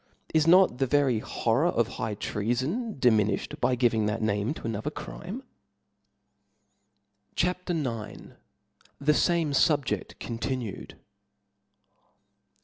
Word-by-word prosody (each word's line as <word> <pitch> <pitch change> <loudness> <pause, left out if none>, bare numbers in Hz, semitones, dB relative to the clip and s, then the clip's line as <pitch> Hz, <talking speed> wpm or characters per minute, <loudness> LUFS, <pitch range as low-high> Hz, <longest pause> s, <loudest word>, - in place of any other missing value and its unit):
Is 160 0 +3
not 180 -7 +5
the 135 - +2
very 135 -4 +2
horror 120 +7 0
of 120 -9 +1
high 110 -2 -4
defaifa' 105 +1 -3
treafon 155 - -1
diminilhed, 110 -4 +2
by 130 - +2
giving 115 -3 +2
that 105 +2 -1
name 105 +1 0
to - - -10
an 115 - -1
mneta. - - -2
other - - -3
crime. - - -7 1.9
CHAP 180 +1 -1
IX. 165 -3 0 0.5
7 - - -22 0.7
he 150 - +5
fame 170 -1 +2
SubjeSt 145 0 +1
continued. 115 -2 -4
125 Hz, 125 wpm, -27 LUFS, 110-155 Hz, 1.9 s, not